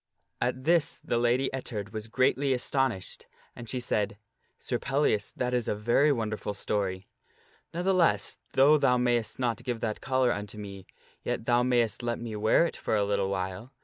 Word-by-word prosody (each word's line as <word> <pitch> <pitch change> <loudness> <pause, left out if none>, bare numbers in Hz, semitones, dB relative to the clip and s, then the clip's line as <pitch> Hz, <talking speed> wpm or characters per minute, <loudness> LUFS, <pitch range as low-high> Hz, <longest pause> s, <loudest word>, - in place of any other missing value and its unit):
At 130 +1 -1
this 165 +1 +2
the 120 - -1
Lady 120 +3 +2
Ettard 105 -5 -5
was 110 0 -5
greatly 130 +3 +2
astonished, 125 -6 -2 0.3
and 120 -2 -9
she 130 - -2
said, 105 -4 -1 0.2
" - - -44
Sir 120 - -3
Pel 135 +1 0
lias, 105 -8 +1
that 125 0 -1
is 120 -2 0
a - - 0
very 120 +8 +3
wonderful 110 -4 -2
story. 95 -2 -2 0.6
Ne'theless, 180 0 +1 0.2
though 145 +3 +6
thou 130 -3 +3
mayst 120 -2 0
not 120 -4 -1
give 120 -2 -3
that 110 -2 -2
collar 130 -2 +2
unto 105 +1 -6
me, 100 -2 -8 0.3
yet 115 - -3
thou 120 0 +3
mayst 120 -4 +1
let 120 -1 -1
me 115 -2 -6
wear 110 +10 +4
it 170 - -3
for - - -1
a 105 -1 +2
little 100 -1 0
while. 95 +6 -4
120 Hz, 180 wpm, -28 LUFS, 105-130 Hz, 0.6 s, though